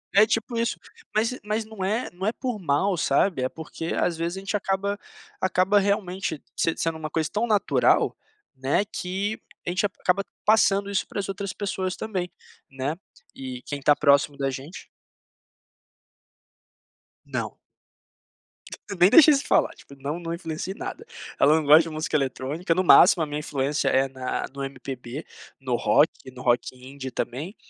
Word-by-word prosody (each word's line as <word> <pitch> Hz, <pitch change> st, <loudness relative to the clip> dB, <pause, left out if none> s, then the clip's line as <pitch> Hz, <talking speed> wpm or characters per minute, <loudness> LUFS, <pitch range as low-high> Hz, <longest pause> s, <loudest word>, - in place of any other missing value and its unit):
É 205 Hz, +2 st, +8 dB
tipo 225 Hz, +2 st, -1 dB
isso, 230 Hz, -1 st, 0 dB, 0.4 s
mas 225 Hz, +4 st, +1 dB
mas 215 Hz, +1 st, -1 dB
não 215 Hz, -3 st, -7 dB
é 220 Hz, +5 st, -1 dB
não 180 Hz, +2 st, -6 dB
é 215 Hz, -, +2 dB
por 245 Hz, -2 st, -4 dB
mal, 175 Hz, +3 st, +1 dB
sabe, 145 Hz, 0 st, +2 dB
é 130 Hz, -, 0 dB
porque 165 Hz, +2 st, -6 dB
às 170 Hz, -2 st, 0 dB
vezes 170 Hz, +2 st, -2 dB
a -, -, -4 dB
gente 200 Hz, +2 st, -1 dB
acaba 200 Hz, +1 st, -1 dB, 0.4 s
acaba 185 Hz, +2 st, +2 dB
realmente 190 Hz, -5 st, 0 dB
se 165 Hz, -, +1 dB
sendo 165 Hz, -1 st, -1 dB
uma 155 Hz, -1 st, -6 dB
coisa 160 Hz, -1 st, -1 dB
tão 210 Hz, +4 st, 0 dB
natural, 215 Hz, -3 st, +3 dB, 0.4 s
né, 135 Hz, +8 st, +1 dB
que 200 Hz, +1 st, -3 dB, 0.3 s
a -, -, +1 dB
gente 185 Hz, +3 st, +1 dB
acaba 195 Hz, 0 st, 0 dB, 0.2 s
passando 200 Hz, -2 st, +3 dB
isso 200 Hz, -, 0 dB
pra -, -, -5 dB
as 195 Hz, -, -3 dB
outras 195 Hz, -1 st, -4 dB
pessoas 190 Hz, -2 st, -3 dB
também, 185 Hz, -5 st, -4 dB, 0.4 s
né. 135 Hz, +3 st, -3 dB, 0.4 s
E 130 Hz, -2 st, -7 dB
quem 145 Hz, -, -4 dB
tá 145 Hz, +2 st, +5 dB
próximo 140 Hz, 0 st, +3 dB
da 135 Hz, -1 st, -1 dB
gente 135 Hz, +7 st, -8 dB, 2.4 s
Não. -, -, -4 dB, 1.3 s
Eu 200 Hz, -, -5 dB
nem 175 Hz, -, +8 dB
deixo 315 Hz, +6 st, +8 dB
isso 285 Hz, -2 st, +3 dB
falar. -, -, +3 dB
Tipo, 140 Hz, -, -15 dB
não, 145 Hz, +5 st, -3 dB
não 165 Hz, -1 st, -4 dB
influencio 170 Hz, +1 st, -4 dB
em -, -, -18 dB
nada. 380 Hz, +4 st, -6 dB, 0.3 s
Ela 150 Hz, +2 st, +6 dB
não 160 Hz, -, +1 dB
gosta 150 Hz, +3 st, +7 dB
de 165 Hz, -, -6 dB
música 155 Hz, 0 st, -3 dB
eletrônica, 145 Hz, +5 st, -1 dB
no 185 Hz, +2 st, +1 dB
máximo 175 Hz, -1 st, +7 dB
a -, -, +2 dB
minha 145 Hz, 0 st, -4 dB
influência 145 Hz, 0 st, -1 dB
é 135 Hz, +1 st, +3 dB
na 130 Hz, -1 st, -3 dB
no 140 Hz, 0 st, -5 dB
MPB, 135 Hz, 0 st, -6 dB, 0.4 s
no 130 Hz, -2 st, -1 dB
rock 120 Hz, +7 st, +4 dB, 0.2 s
e 130 Hz, -, -9 dB
no 125 Hz, -1 st, -11 dB
rock 120 Hz, 0 st, +1 dB
indie 130 Hz, +1 st, -8 dB
também, 140 Hz, -, -4 dB
170 Hz, 175 wpm, -25 LUFS, 140-200 Hz, 2.4 s, É